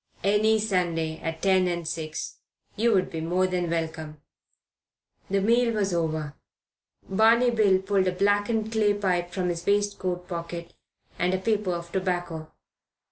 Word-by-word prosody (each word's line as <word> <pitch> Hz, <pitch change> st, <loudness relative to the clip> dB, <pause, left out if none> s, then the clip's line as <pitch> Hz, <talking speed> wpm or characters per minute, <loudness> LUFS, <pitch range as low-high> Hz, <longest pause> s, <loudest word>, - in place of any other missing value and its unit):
"Any 210 Hz, +3 st, +3 dB
Sunday, 175 Hz, -6 st, -1 dB
at 165 Hz, 0 st, -5 dB
ten 190 Hz, -2 st, +4 dB
and 170 Hz, -2 st, -2 dB
six. 155 Hz, -1 st, -4 dB, 0.4 s
You 230 Hz, +2 st, +2 dB
would 185 Hz, -, +1 dB
be 160 Hz, -, -4 dB
more 180 Hz, +3 st, +1 dB
than 180 Hz, -2 st, -1 dB
welcome." 160 Hz, -2 st, -3 dB, 1.1 s
The 195 Hz, 0 st, +1 dB
meal 230 Hz, +2 st, +3 dB
was 200 Hz, -3 st, 0 dB
over. 155 Hz, -3 st, -1 dB, 0.7 s
Barney 225 Hz, +5 st, +4 dB
Bill 205 Hz, -5 st, +3 dB
pulled 190 Hz, -1 st, +1 dB
a -, -, +2 dB
blackened 205 Hz, +3 st, +1 dB
clay 210 Hz, -2 st, +2 dB
pipe 180 Hz, -3 st, 0 dB
from 180 Hz, -1 st, -1 dB
his 170 Hz, -1 st, -3 dB
waistcoat 200 Hz, -3 st, 0 dB
pocket 170 Hz, -1 st, -6 dB, 0.5 s
and 180 Hz, +1 st, +2 dB
a -, -, +1 dB
paper 205 Hz, -1 st, 0 dB
of 170 Hz, 0 st, -7 dB
tobacco. 175 Hz, -4 st, -3 dB
185 Hz, 145 wpm, -26 LUFS, 170-205 Hz, 1.1 s, ten